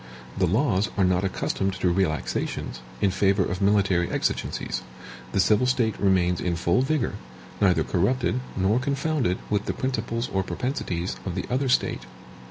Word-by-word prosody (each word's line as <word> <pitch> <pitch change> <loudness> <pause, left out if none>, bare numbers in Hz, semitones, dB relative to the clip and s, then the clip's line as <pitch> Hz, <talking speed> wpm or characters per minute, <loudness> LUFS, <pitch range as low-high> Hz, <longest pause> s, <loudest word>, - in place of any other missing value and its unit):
The 95 - +2
laws 105 - +2
are 100 - +3
not 90 +1 +2
accustomed 95 0 -1
to 95 -1 +1
relaxations, 85 -8 -1 0.2
in 100 - +3
favor 95 0 +2
of 90 +2 -3
military 100 -3 +3
exigencies; - - -2 0.5
the - - 0
civil 110 +6 +4
state 120 -4 +2
remains 90 -3 +2
in 90 -1 0
full 85 +6 +2
vigor, 140 -4 0 0.5
neither 90 -5 +4
corrupted, 115 - +1 0.2
nor 100 +5 +2
confounded 140 - 0
with 105 -1 +1
the - - -1
principles 115 -2 -2
or 95 - +2
propensities 90 - -3
of 90 -3 -4
the - - -2
other 130 +1 +1
state. 65 - +1
95 Hz, 155 wpm, -25 LUFS, 90-120 Hz, 0.5 s, civil